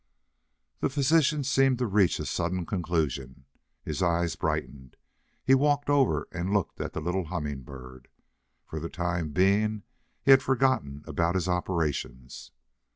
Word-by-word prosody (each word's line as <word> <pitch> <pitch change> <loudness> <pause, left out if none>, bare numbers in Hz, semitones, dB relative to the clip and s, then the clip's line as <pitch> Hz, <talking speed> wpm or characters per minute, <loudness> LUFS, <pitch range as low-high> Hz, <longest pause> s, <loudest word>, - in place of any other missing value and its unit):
The - - 0
physician 150 +2 +2
seemed 135 -1 +3
to 125 - 0
reach 100 -4 +2
a - - -4
sudden 85 +1 -2
conclusion. 75 -8 -2 0.4
His 75 +3 -4
eyes 85 -1 +1
brightened. 65 -2 -4 0.5
He 135 - +5
walked 145 +1 +2
over 140 -3 +2
and 90 +1 -3
looked 100 -3 -1
at - - -5
the - - -4
little 90 +3 -1
Humming 75 -5 -4
Bird. 65 -1 -12 0.6
For 80 - -6
the 85 +2 -5
time 85 -2 -2
being 100 +6 +2 0.4
he 135 - +8
forgot 130 0 +2 0.2
about 85 +3 0
his 95 -1 0
operations. 80 -8 -3
90 Hz, 140 wpm, -27 LUFS, 80-125 Hz, 0.6 s, he